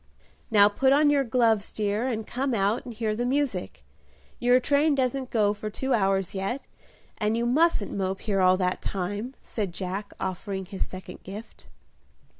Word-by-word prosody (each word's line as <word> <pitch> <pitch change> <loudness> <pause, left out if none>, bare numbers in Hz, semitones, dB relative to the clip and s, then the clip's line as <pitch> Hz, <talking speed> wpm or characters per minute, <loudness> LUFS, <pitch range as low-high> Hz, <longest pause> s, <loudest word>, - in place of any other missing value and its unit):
"Now 205 -3 +7
put 265 +6 +3
on 290 +1 +5
your 280 -1 +3
gloves, 225 -4 +2
dear, 210 +3 -1
and 220 -4 -2
come 260 +1 -1
out 205 +3 +1
and 240 - -7
hear 215 -1 -1
the 240 - -1
music: 275 +2 -1 0.5
your 245 +1 +5
train 285 +3 +3
doesn't 260 0 -1
go 210 -3 +2
for 215 +1 -5
two 265 +5 -2
hours 195 -3 +1
yet, 200 +8 -3 0.6
and 215 +1 +1
you 235 - 0
mustn't 280 -3 +2
mope 190 -1 -2
here 200 -3 0
all 185 0 +5
that 180 -1 -1
time," 205 +7 -3
said 200 -6 -3
Jack, 195 +2 -4
offering 190 +1 -3
his 195 +1 -4
second 185 -1 -9
gift. 205 +4 -10
215 Hz, 170 wpm, -26 LUFS, 195-250 Hz, 0.6 s, Now